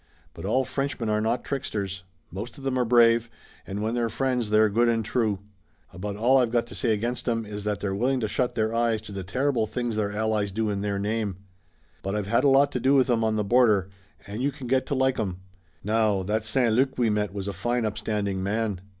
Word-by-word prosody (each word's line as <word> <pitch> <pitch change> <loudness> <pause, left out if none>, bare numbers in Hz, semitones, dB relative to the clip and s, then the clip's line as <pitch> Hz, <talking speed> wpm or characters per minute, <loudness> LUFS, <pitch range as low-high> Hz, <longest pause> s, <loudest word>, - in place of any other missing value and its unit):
But - - -8
all 130 0 +2
Frenchmen 135 -4 -2
are 105 0 +1
not 115 +2 0
tricksters. 100 -8 -3 0.3
Most 105 - -7
of 135 - -10
'em 130 -1 0
are 125 - +2
brave, 115 -1 +4 0.4
and 100 +2 -4
when 110 +1 -1
they're 120 -1 0
friends 125 -3 -1
they're 110 +1 +5
good 115 +3 +2
and 115 -2 0
true. 110 -4 0 0.6
About 100 +3 -5
all 120 +6 +4
I've 125 -2 +2
got 120 0 +1
to 120 - -11
say 120 -5 0
against 120 +4 -1
'em 115 -1 -1
is 105 0 -7
that 105 -3 -1
they're 95 -1 -1
willing 125 +6 +1
to 110 - 0
shut 125 +4 -1
their 110 0 0
eyes 115 -1 +1
to 110 - -8
the 100 -1 -5
terrible 125 +4 0
things 120 0 -2
their 105 -1 0
allies 105 -1 0
do 110 +1 -1
in 100 -1 -2
their 100 -1 -1
name. 105 -1 -1 0.7
But 95 +2 -3
I've 105 -2 -1
had 115 +4 +2
a - - +5
lot 140 +1 +5
to 125 - -2
do 135 +3 +3
with 130 -2 +4
'em 115 -1 +2
on 110 -1 +1
the 105 - +1
border, 105 -4 +3 0.4
and 105 +3 -5
you 140 +2 +1
can 135 - -9
get 130 +2 +1
to 140 - -1
like 130 0 +1
'em. 95 -5 -2 0.5
Now, 105 -2 +1
that 105 +3 -1
St. 120 0 +2
Luc 130 +3 +2
we 120 -3 +2
met 105 -1 0
was 100 -1 -5
a 100 - -2
fine 120 +5 -1
upstanding 105 -2 -2
man." 105 -1 -1
110 Hz, 235 wpm, -26 LUFS, 105-125 Hz, 0.7 s, they're